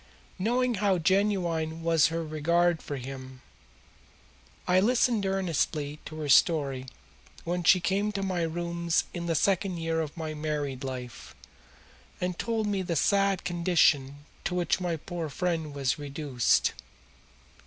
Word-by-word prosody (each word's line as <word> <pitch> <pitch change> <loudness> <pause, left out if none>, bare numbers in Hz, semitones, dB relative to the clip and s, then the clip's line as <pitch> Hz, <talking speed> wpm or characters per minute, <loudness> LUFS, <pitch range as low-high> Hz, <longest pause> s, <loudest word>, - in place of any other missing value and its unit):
Knowing 245 +5 +1
how 195 -3 +3
genuine 170 -3 0
was 165 -2 +4
her 165 0 -2
regard 170 +2 +1
for 145 - -5
him, 130 0 -8 1.3
I 180 +1 +4
listened 230 -1 +2
earnestly 160 -6 -1
to 155 - -8
her 150 - -3
story 140 -3 +3 0.6
when 175 +1 -2
she 185 +2 +6
came 200 +4 0
to 195 -1 -2
my 185 -2 -1
rooms 170 0 0
in 170 -1 -4
the 165 - +1
second 190 +2 +1
year 165 0 -1
of 155 -1 -6
my 160 -1 -4
married 150 -3 -3
life 125 -2 -7 0.8
and 180 -1 -3
told 225 -2 -1
me 205 -2 0
of 185 - -4
the 170 - -1
sad 195 +3 +2
condition 155 -5 +2 0.2
to 180 - -2
which 180 +1 +1
my 175 -2 -1
poor 165 0 -5
friend 165 0 -2
was 140 -1 -1
reduced. 140 -4 +1
170 Hz, 145 wpm, -28 LUFS, 150-185 Hz, 1.3 s, she